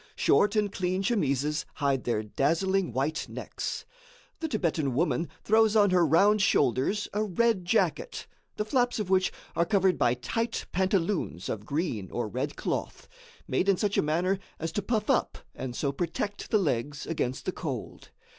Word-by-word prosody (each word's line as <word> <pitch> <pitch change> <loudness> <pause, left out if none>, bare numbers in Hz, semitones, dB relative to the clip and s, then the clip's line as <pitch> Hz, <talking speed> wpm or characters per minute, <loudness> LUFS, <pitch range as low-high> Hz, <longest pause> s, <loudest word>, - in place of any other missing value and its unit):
Short 205 +1 +3
and 210 -2 +1
clean 185 0 -1
chemises 150 - 0
hide 140 -3 0
their 110 -3 0
dazzling 170 - +1
white 140 +7 -1
necks. - - -5 0.5
The 320 - -2
Thibetan 165 - 0
woman 165 +2 +1
throws 220 0 +4
on 205 -3 +5
her 180 -1 +4
round 195 +7 +4
shoulders 145 - +2
a 210 +1 +1
red 215 -1 +1
jacket, 230 - 0 0.3
the 210 - -2
flaps 245 +1 +1
of 205 -4 -3
which 185 -1 +3 0.2
are 170 - +3
covered 190 0 +2
by 120 0 +3
tight 225 - -2
pantaloons 185 - 0
of 105 -1 -4
green 140 - -2
or 120 -2 -2
red 105 - -3
cloth, - - -4 0.4
made 180 +9 +1
in 195 - +4
such 205 0 0
a - - +4
manner 175 +6 +1 0.2
as 165 0 -3
to 205 - -1
puff 215 +1 -1
up - - +1 0.2
and 130 -2 -5
so 140 +1 0
protect 175 +7 -3
the 215 - +4
legs 145 - -1
against 130 -6 -2
the - - 0
cold. 140 -11 -6
180 Hz, 165 wpm, -28 LUFS, 140-205 Hz, 0.5 s, on